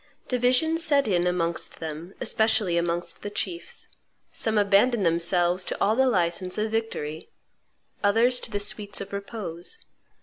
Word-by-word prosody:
Division 255 +6 +3
set 290 -6 +3
in 180 -3 +2
amongst 170 -2 -1
them, 160 +3 -6
especially 220 -6 +2
amongst 170 0 -1
the 205 - -4
chiefs. 180 -4 -4 0.4
Some 220 -1 0
abandoned 205 +2 +4
themselves 175 +2 +2
to - - -3
all 215 +2 +3
the 265 +2 +4
license 180 -2 0
of 215 +1 -1
victory, 190 -9 -3 0.7
others 230 +5 +4
to - - -6
the 205 -2 -2
sweets 205 0 -2
of 200 0 -7
repose. 200 - -5
200 Hz, 140 wpm, -26 LUFS, 175-225 Hz, 0.7 s, abandoned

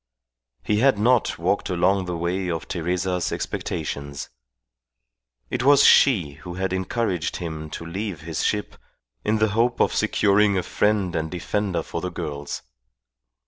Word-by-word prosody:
He 105 0 +1
had 130 -2 +4
not 120 +3 +2
walked 90 +5 0
along 95 +1 +2
the 90 -1 -3
way 90 +2 -1
of 80 -1 -3
Teresa's 90 +1 -1
expectations. 70 -1 -4 1.2
It - - -1
was 140 +1 +6
she 85 - +5
who 90 -1 -7
had 95 0 -2
encouraged 95 -3 -1
him 80 -3 -5
to 85 - -7
leave 95 -1 -4
his 80 -1 -3
ship, 105 -1 -1 0.5
in 110 - +1
the 110 0 +2
hope 115 +3 +1
of - - +3
securing 100 0 +3
a 90 - 0
friend 100 -4 +1
and 80 0 -1
defender 95 +2 -2
for - - -5
the 90 - -2
girls. 70 -7 -5
90 Hz, 145 wpm, -24 LUFS, 85-105 Hz, 1.2 s, was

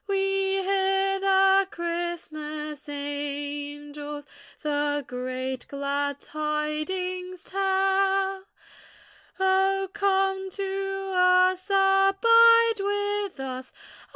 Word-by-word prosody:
We 390 -1 0
hear 390 0 +1
the 390 0 +4
Christmas 310 -4 -5
angels 290 0 -5 0.4
The 290 -1 -1
great 255 +1 -5
glad 280 0 -2
tidings 315 +5 -3
tell; 385 0 +1 0.9
Oh 385 0 +2
come 385 -1 +1
to 390 0 -4
us, 365 +1 +3
abide 440 +4 +5
with 410 -2 -2
us. 260 -1 -6
380 Hz, 70 wpm, -26 LUFS, 295-390 Hz, 0.9 s, abide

